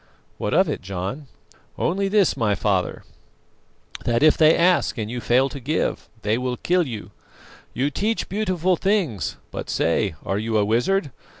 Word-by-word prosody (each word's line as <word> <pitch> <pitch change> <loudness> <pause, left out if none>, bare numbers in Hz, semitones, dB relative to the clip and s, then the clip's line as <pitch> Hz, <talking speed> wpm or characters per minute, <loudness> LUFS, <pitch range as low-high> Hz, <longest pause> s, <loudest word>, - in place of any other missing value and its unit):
"What - - -1
of - - +4
it, - - -3
John?" 100 +9 -5 0.5
"Only 195 +3 0
this, 200 -2 +3
my 110 -6 +1
father, 100 -3 -1 1.0
that 120 +3 +1
if 155 - +6
they 155 0 +5
ask 175 -3 +3
and 110 -1 -3
you 125 0 -4
fail 130 +4 +3
to 140 - -7
give, 145 +5 -2
they 110 +3 +1
will 125 -1 -2
kill 180 -2 +1
you. 110 -5 -7 0.6
You 140 +3 0
teach 220 +8 -1
beautiful 185 -3 0
things, 185 - 0
but - - -6
say, 85 +2 +1
are 95 +2 -1
you 110 0 0
a 105 - +3
wizard? 135 - +1
130 Hz, 165 wpm, -23 LUFS, 110-180 Hz, 1.0 s, if